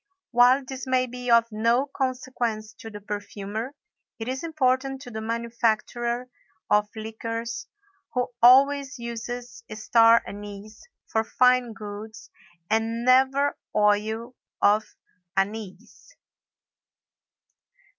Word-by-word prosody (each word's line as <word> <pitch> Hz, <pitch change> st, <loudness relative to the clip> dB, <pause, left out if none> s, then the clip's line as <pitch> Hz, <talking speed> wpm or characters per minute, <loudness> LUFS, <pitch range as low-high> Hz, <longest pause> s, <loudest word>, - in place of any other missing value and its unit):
While 250 Hz, +2 st, +5 dB
this 265 Hz, +1 st, -7 dB
may 255 Hz, 0 st, +2 dB
be 250 Hz, 0 st, -6 dB
of 235 Hz, -1 st, +6 dB
no 230 Hz, +5 st, +2 dB
consequence 250 Hz, -5 st, -3 dB
to 225 Hz, -, -8 dB
the 210 Hz, -1 st, -9 dB
perfumer, 205 Hz, +4 st, -5 dB, 0.4 s
it 225 Hz, -, -6 dB
is 260 Hz, +3 st, -3 dB
important 270 Hz, -4 st, 0 dB
to 245 Hz, -, -10 dB
the 220 Hz, -1 st, -5 dB
manufacturer 235 Hz, +1 st, -1 dB, 0.4 s
of 210 Hz, 0 st, +3 dB
liqueurs 230 Hz, +1 st, -5 dB, 0.5 s
who 250 Hz, 0 st, 0 dB
always 275 Hz, +3 st, +5 dB
uses 235 Hz, 0 st, -6 dB
star 230 Hz, +1 st, +5 dB
anise 205 Hz, +1 st, -9 dB, 0.2 s
for 220 Hz, -, 0 dB
fine 250 Hz, 0 st, +3 dB
goods 215 Hz, +1 st, -9 dB, 0.4 s
and 225 Hz, +2 st, 0 dB
never 265 Hz, +3 st, +3 dB, 0.2 s
oil 215 Hz, +3 st, +1 dB, 0.3 s
of 210 Hz, +1 st, +3 dB, 0.5 s
anise. 205 Hz, -, -4 dB
235 Hz, 105 wpm, -25 LUFS, 220-255 Hz, 0.5 s, of